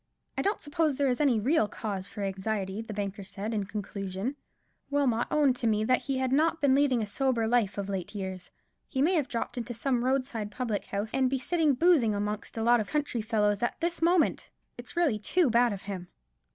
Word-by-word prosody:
"I - - 0
don't 405 +2 0
suppose 300 -1 0
there 280 -2 +2
is 250 - -1
any 260 -7 +3
real 250 0 +2
cause 200 -2 -4
for 205 - -6
anxiety," 195 +1 -2
the 225 - -8
banker 200 -1 -4
said, 200 +4 -5
in 205 -2 -1
conclusion; 200 +2 -4 0.5
"Wilmot 270 -5 +1
owned 285 -4 +3
to 235 - -1
me 215 -1 +2
that 255 +3 +2
he 270 -1 -2
had 260 -1 0
not 320 +4 +2
been 285 -3 +4
leading 265 -4 +3
a - - -1
sober 240 +1 0
life 220 -4 +1
of 200 -1 -3
late 195 +1 -4
years. 190 -2 -5 0.4
He 265 - -4
may 320 +7 +4
have 305 -7 +1
dropped 235 +1 -3
into 240 0 -5
some 245 0 0
roadside 255 -5 -1
public 220 -1 -3
house 205 +2 -3
and 260 -1 +2
be 270 - 0
sitting 305 +1 +1
boozing 285 -9 +4
amongst 210 +2 -3
a 225 - -1
lot 240 +1 +5
of 215 - -3
country 290 -6 -1
fellows 210 -2 +1
at 240 - -1
this 340 0 -1
moment. 340 0 +2 0.3
It's - - -8
really 295 -12 +2
too 300 - +2
bad 240 +1 +4
of 200 -2 -6
him." 190 -3 -6
235 Hz, 215 wpm, -29 LUFS, 205-275 Hz, 0.5 s, lot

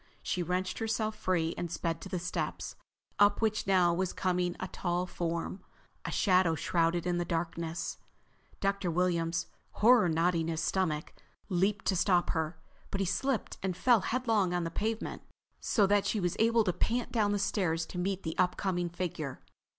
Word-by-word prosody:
She 180 - -1
wrenched 180 +2 -1
herself 220 -1 -1
free 175 -5 0
and 175 - -3
sped 165 0 -2
for 190 - -8
the 185 - -2
steps, 175 0 -3 0.4
up 205 0 +5
which 215 -2 0
now 180 -3 +4
was 185 +1 -1
coming 180 -1 0
a 185 - -3
tall 175 -1 -1
form, 170 +1 -3 0.4
a - - -2
shadow 185 -4 +3
shrouded 170 +1 +1
in 175 -1 0
the - - +1
darkness. 165 0 -3 0.6
Dr. 195 -2 0
Williams, 165 -2 +1 0.3
horror 230 -4 +5
knotting 165 0 +1
his 165 -1 -2
stomach, 160 -2 -1 0.4
leaped 195 +2 +1
to 190 - +2
stop 180 0 +3
her. 160 0 -2 0.3
But 195 - -3
he - - +1
slipped 230 +7 -1
and 185 -2 -2
fell 240 +2 +5
headlong 220 -6 +1
on 175 - 0
the 165 - -3
pavement, 220 +5 -2 0.4
so 210 -5 +3
that 200 0 +3
she 215 - 0
was 175 -2 0
able 230 0 +4
to 180 -4 0
pant 240 +6 -1
down 215 -3 +2
the 205 - +1
stairs 175 -5 0
to 180 - -6
meet 190 +1 -1
the 160 - -2
upcoming 180 -1 +1
figure. 165 -6 -4
180 Hz, 175 wpm, -31 LUFS, 170-200 Hz, 0.6 s, up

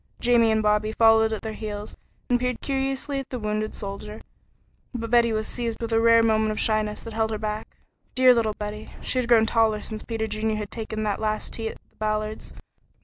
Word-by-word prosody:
Jamie 240 -2 +4
and 220 0 +2
Bobby 210 0 +2
followed 225 0 +5
at 220 - -4
their 220 -1 -4
heels 210 -1 -6 0.3
and 245 -1 +2
peered 250 0 0
up - - -17
curiously 270 +1 -1
at 270 - -7
the 255 - -4
wounded 215 -1 -2
soldier, 210 +2 -7 0.8
but 230 -1 -4
Betty 235 -1 +5
was 215 0 -1
seized 235 -1 -2
with 230 -1 -3
a 225 - +4
rare 230 0 +6
moment 220 -1 +2
of 215 - -2
shyness 215 -1 0
that 230 - -8
held 220 0 0
her 220 - -2
back. 215 0 -5 0.4
Dear 255 -1 +7
little 220 -3 0
Betty! 210 +1 -6
She 255 - 0
had 245 -1 -2
grown 225 -2 +6
taller 220 -1 +2
since 215 0 -7
Peter 225 -1 -3
Junior 215 0 -1
had 210 -1 -5
taken 220 -1 -4
that 210 -1 -1
last 215 0 -2
tea 225 -1 -3
at - - -9
the - - -35
Ballards. 215 0 -2
220 Hz, 215 wpm, -25 LUFS, 215-230 Hz, 0.8 s, Dear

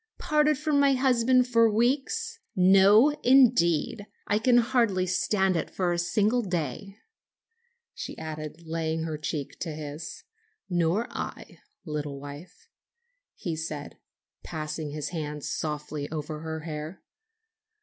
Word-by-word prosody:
"Parted 300 -1 +2
from 300 -1 +1
my 280 -1 +5
husband 255 -1 +3
for 230 -2 +4
weeks? 275 - 0 0.2
No, 195 +7 +6
indeed! 225 - +4 0.2
I 210 - +1
can 240 +2 +4
hardly 230 -6 +2
stand 190 +1 +1
it 165 - -1
for 180 -2 0
a 170 - -1
single 210 +7 +2
day," 180 - -4 1.0
she - - -7
added, 155 +1 -7
laying 160 0 -2
her 155 -2 -4
cheek 150 -2 -4
to 170 - -3
his. 150 0 -7 0.4
"Nor 175 +4 +1
I, - - -7 0.3
little 150 -3 -4
wife," 145 - -11 0.7
he 170 -6 -4
said, 155 -2 -6 0.4
passing 155 0 -5
his 145 0 -4
hand 150 -4 -5
softly 150 -1 -4
over 155 0 -5
her 160 0 -5
hair. 155 +2 -7
175 Hz, 125 wpm, -27 LUFS, 155-230 Hz, 1.0 s, No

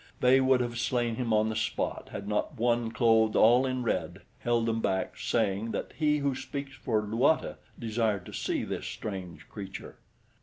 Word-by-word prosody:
They 130 +1 +5
would 130 -1 +4
have 120 -1 -3
slain 120 -2 0
him 120 -3 -1
on 110 0 +3
the 110 - -3
spot 110 +1 -2
had 100 - -6
not 105 0 -1
one 120 0 +1
clothed 110 -1 +3
all 120 +4 +5
in 130 -1 -2
red 115 - -2 0.2
held 120 -1 +1
them 115 0 0
back, 95 -3 -1
saying 110 0 0
that - - -4
He 150 -2 +2
Who 140 -1 0
Speaks 135 +1 -6
for 110 -5 -1
Luata 120 +9 +1 0.2
desired 110 -4 -1
to - - -10
see - - -1
this - - -4
strange 95 -6 -6
creature. 95 -2 -8
115 Hz, 180 wpm, -29 LUFS, 110-125 Hz, 0.2 s, They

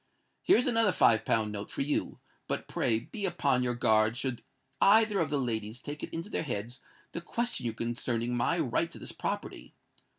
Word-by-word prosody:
Here 375 - +5
is 250 - +2
another 230 -5 +3
five 110 -9 +4
pound 110 -2 +1
note 105 0 -6
for - - -2
you; 145 +1 -2 0.3
but - - -3
pray 110 - +1
be 205 - -5
upon 140 -8 +1
your 125 -1 0
guard 110 0 +3
should 130 -2 -2 0.4
either 215 0 +5
of 165 - +1
the 145 - 0
ladies 115 -3 -2
take 145 +2 -7
it - - -5
into 165 +3 -5
their - - -1
heads 120 -3 -4 0.3
to 170 - -4
question 230 - -2
you 115 - -2
concerning 120 +1 -2
my 120 - +1
right - - 0
to - - -11
this - - -7
property. - - -5
125 Hz, 195 wpm, -30 LUFS, 115-170 Hz, 0.4 s, Here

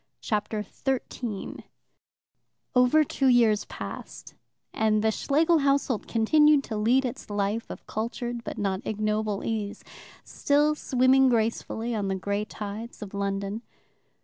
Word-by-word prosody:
Chapter 210 0 -2
13 240 -3 -4 1.1
Over 250 +5 +5
two 270 -2 0
years 230 -4 +4
passed, - - -8 0.4
and 215 -1 +2
the 220 - +3
Schlegel 315 +8 +2
household 275 -4 +1
continued 295 +6 +4
to 220 - -5
lead 240 +5 +3
its 255 -1 -6
life 205 +2 -1
of - - -9
cultured 235 +2 -4
but - - -6
not 195 -1 -1
ignoble 215 -1 -1
ease, 210 -2 -3 0.4
still 295 +1 +2
swimming 260 -2 +3
gracefully 230 0 -1
on 205 -3 -1
the 190 - -1
grey 200 +2 -2
tides 215 +3 -7
of 205 - -10
London. 200 +1 -2
225 Hz, 125 wpm, -27 LUFS, 210-260 Hz, 1.1 s, Over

